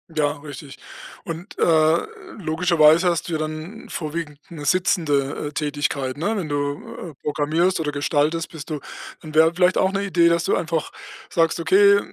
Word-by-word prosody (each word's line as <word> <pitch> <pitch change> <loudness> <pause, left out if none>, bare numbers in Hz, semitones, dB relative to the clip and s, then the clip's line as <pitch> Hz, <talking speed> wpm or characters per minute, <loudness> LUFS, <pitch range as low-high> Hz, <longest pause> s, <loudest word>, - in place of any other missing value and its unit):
Ja, 150 -2 +2
richtig. 145 -1 -10 0.5
Und, 170 +2 -7
äh, 160 0 +4 0.4
logischerweise 165 -1 +4
hast 170 0 -2
du - - -3
ja - - +1
dann 155 +8 -6
vorwiegend 155 -2 -5
'ne 155 -4 -8
sitzende, 150 -5 +1
äh, - - -12
Tätigkeit, 145 -3 -2
ne? 205 +9 -1
Wenn 180 -7 -3
du, 145 +3 -4
äh, - - -18
programmierst 155 +5 +1
oder 150 -2 -1
gestaltest, 150 +3 0
bist 160 -1 -9
du 150 - -2 0.4
dann, 155 -2 -10
wäre 160 +1 +5
vielleicht 180 +1 +3
auch 190 - +2
'ne 195 0 -1
Idee, 175 -4 +3
dass 170 0 +2
du - - +2
einfach 165 -2 -2 0.4
sagst: 165 -1 +1
„Okay, 200 +4 +5
160 Hz, 170 wpm, -22 LUFS, 150-170 Hz, 0.5 s, wäre